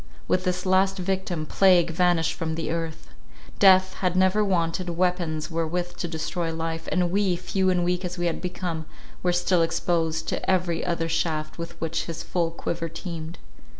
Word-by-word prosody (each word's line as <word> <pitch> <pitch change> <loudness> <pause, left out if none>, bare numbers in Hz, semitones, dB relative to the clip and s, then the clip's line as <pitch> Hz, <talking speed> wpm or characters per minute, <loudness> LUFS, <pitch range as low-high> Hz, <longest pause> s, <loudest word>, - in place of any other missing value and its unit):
With 185 +1 +1
this 180 +1 -1
last 190 +1 +3
victim 185 -3 -2
Plague 175 -1 +4
vanished 175 -1 +2
from 160 -2 -3
the 165 -1 -3
earth. 165 -1 -4 0.5
Death 185 -1 +6
had 180 -2 0
never 190 +3 +4
wanted 180 -2 0
weapons 170 -3 -1
wherewith 170 +2 -2
to 175 - -2
destroy 165 +1 -2
life, 165 0 -4
and 180 -2 +1
we, 195 -2 +2
few 185 +2 0
and 180 -1 +2
weak 180 +1 0
as 180 0 -4
we 175 - -1
had 170 - -1
become, 175 -3 -4 0.3
were 180 - +2
still 175 0 +2
exposed 165 -1 0
to - - -2
every 180 -3 +1
other 170 -1 -1
shaft 160 -1 -1
with 170 0 -6
which 165 0 -2
his 165 0 -5
full 170 -2 0
quiver 165 0 -4
teemed. 165 0 -6
175 Hz, 175 wpm, -25 LUFS, 165-185 Hz, 0.5 s, Death